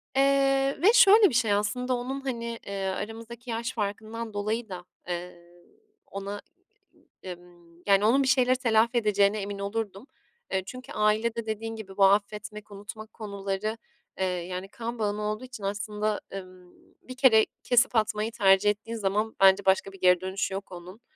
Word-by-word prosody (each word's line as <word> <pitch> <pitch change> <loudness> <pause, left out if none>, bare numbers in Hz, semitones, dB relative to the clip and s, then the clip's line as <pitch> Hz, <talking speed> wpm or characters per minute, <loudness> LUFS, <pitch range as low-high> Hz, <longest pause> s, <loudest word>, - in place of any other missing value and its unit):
Eee, 275 0 +3
ve 410 +6 +6
şöyle 430 -4 +7
bir - - -6
şey 225 -3 +3
aslında 250 +5 0
onun 260 +3 -4
hani, 235 -3 -4
eee, 200 -1 -4
aramızdaki 225 +5 -6
yaş 230 +1 -3
farkından 220 +1 -4
dolayı 215 +3 -2
da, 180 -2 -7 0.2
eee, 175 0 -5 0.7
ona, 200 +1 -6 0.9
ımm, 175 -1 -12
yani 200 0 +4
onun 265 +5 +4
bir - - -1
şeyleri 255 -1 +4
telafi 235 -1 +2
edeceğine 210 -2 +2
emin 200 0 -5
olurdum. 200 +2 -4 0.5
Eee, 190 - 0
çünkü 255 +5 -9
ailede 220 +2 +1
dediğin 225 +1 -4
gibi 200 -3 -10
bu 195 - +6
affetmek, 210 +1 0
unutmak 210 +2 -9
konuları, 200 0 -4 0.4
eee, 190 - +2
yani 180 +1 -4
kan 235 +2 -6
bağın 205 -1 -1
olduğu 210 +2 -3
için 255 -5 -10
aslında, 210 +1 -2
ımm, 185 -2 -11 0.3
bir 255 - -10
kere 235 -5 +6 0.2
kesip 245 +1 +3
atmayı 215 0 0
tercih 195 -1 +4
ettiğin 220 +3 -3
zaman 210 +2 -1
bence 195 +1 +6
başka 190 +1 +2
bir 195 - -14
geri 180 -1 +4
dönüşü 190 +1 -2
yok 195 0 -6
onun. 180 +5 -10
210 Hz, 160 wpm, -27 LUFS, 195-230 Hz, 0.9 s, şöyle